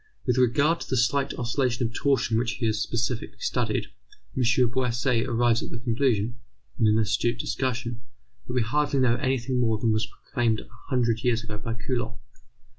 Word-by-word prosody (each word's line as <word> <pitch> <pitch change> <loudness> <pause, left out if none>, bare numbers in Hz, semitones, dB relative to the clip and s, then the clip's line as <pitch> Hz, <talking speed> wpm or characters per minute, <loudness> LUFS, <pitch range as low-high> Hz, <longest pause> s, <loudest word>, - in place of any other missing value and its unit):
With 125 0 +2
regard 140 +7 +3
to - - -8
the 130 - +1
slight 135 +3 +1
oscillations 120 -1 0
of - - -18
torsion 130 -5 +2
which 120 0 0
he 120 - -3
has 110 -1 +1
specially 115 +1 -2
studied, - - -1 0.5
M. 130 - 0 0.3
Bouasse 125 -1 +1
arrives 120 -1 +2
at - - -5
the - - -5
conclusion, 115 -2 0 0.4
in 110 - +4
an 105 0 +4
acute 110 +2 +1
discussion, 120 -1 -2 0.5
that 125 - -4
we 125 -2 +2
hardly 145 +4 +1
know 120 -2 +3
anything 130 -2 0
more 115 -3 +2
than 110 0 +1
was 110 0 0
proclaimed 115 0 -1
a - - -15 0.2
hundred 120 -3 +1
years 120 -2 +1
ago 110 -2 -6
by 115 +2 -4
Coulomb. 120 0 -3
120 Hz, 180 wpm, -26 LUFS, 115-130 Hz, 0.5 s, in